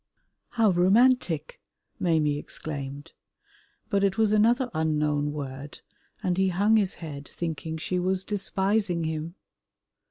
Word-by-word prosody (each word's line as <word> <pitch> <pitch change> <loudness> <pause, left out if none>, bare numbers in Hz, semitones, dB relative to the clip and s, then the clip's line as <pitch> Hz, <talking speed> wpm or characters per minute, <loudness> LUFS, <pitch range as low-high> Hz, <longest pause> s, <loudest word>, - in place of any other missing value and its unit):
"How 220 -3 +5
romantic," 185 - +2 0.4
Maimie 155 -4 +1
exclaimed, 145 0 -6 0.8
but 200 -1 +2
it 195 +1 +1
was 220 -2 +3
another 235 +4 +3
unknown 150 -2 0
word, 140 -1 -7 0.4
and 180 -1 0
he 190 - +3
hung 200 +5 +3
his 200 -3 +1
head 145 -4 -8
thinking 160 -1 -4
she 180 +3 -2
was 185 +1 0
despising 195 -2 0
him. 160 +2 -4
175 Hz, 120 wpm, -26 LUFS, 150-200 Hz, 0.8 s, How